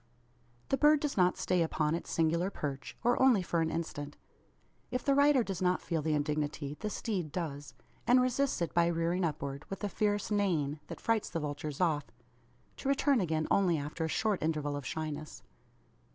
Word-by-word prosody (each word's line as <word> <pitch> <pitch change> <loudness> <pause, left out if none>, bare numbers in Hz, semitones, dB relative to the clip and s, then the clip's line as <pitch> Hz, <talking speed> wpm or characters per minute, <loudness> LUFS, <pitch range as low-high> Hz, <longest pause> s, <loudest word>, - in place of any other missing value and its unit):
The 270 - +2
bird 300 +1 +5
does 290 -1 -2
not 180 -1 +3
stay 180 -1 +1
upon 155 -2 +1
its 170 - -4
singular 170 +3 +1
perch, 140 -8 -5
or 245 +2 +3
only 250 -8 +5
for 170 -1 0
an 160 - +1
instant. 150 -3 -4 0.7
If 250 -1 -3
the 280 - +4
rider 280 -2 +5
does 195 -5 -4
not 180 0 +2
feel 165 -3 -2
the 155 0 +1
indignity 150 -1 -2
the 215 - -3
steed 190 -8 -3
does; 145 -4 -5 0.3
and 245 +1 +6
resists 255 -5 +1
it 170 - -3
by 170 -1 +4
rearing 170 +2 0
upward, 140 -3 -3
with 195 - -6
a 205 - 0
fierce 205 +1 0
neighing, 165 -8 +1
that - - -7
frights 225 -2 0
the 165 - -2
vultures 145 -1 -4
off 155 -5 +1 0.7
to 270 - -3
return 275 -3 +3
again 160 -3 0
only 180 -4 +3
after 150 +3 -4
a - - 0
short 210 +3 0
interval 150 -2 -1
of 145 - -5
shyness. 155 -1 -5
170 Hz, 185 wpm, -32 LUFS, 150-210 Hz, 0.7 s, and